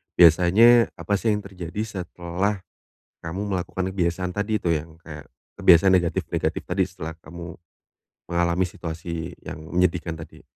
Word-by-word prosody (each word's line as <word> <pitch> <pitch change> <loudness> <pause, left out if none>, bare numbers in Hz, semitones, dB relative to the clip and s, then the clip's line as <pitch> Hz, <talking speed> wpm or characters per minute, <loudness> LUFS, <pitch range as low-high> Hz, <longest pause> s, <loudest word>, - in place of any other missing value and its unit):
Biasanya 95 +8 +6
apa 100 - -3
sih 110 -1 +2
yang 105 - -5
terjadi 90 0 -6
setelah 95 -1 -3 0.6
kamu 80 +3 -5 0.2
melakukan 95 +1 -2
kebiasaan 90 0 -1
tadi 105 +1 0
itu 85 -4 +1
yang 80 +1 -6
kayak 75 -3 -11 0.2
kebiasaan 95 +2 +6
negatif-negatif 85 -2 0
tadi 95 +2 +1
setelah 85 -3 -5
kamu 85 0 -9 0.8
mengalami 85 +1 +2
situasi 85 -1 -6
yang - - -7
menyedihkan 85 0 0
tadi? 80 - -11
90 Hz, 130 wpm, -24 LUFS, 85-95 Hz, 0.8 s, Biasanya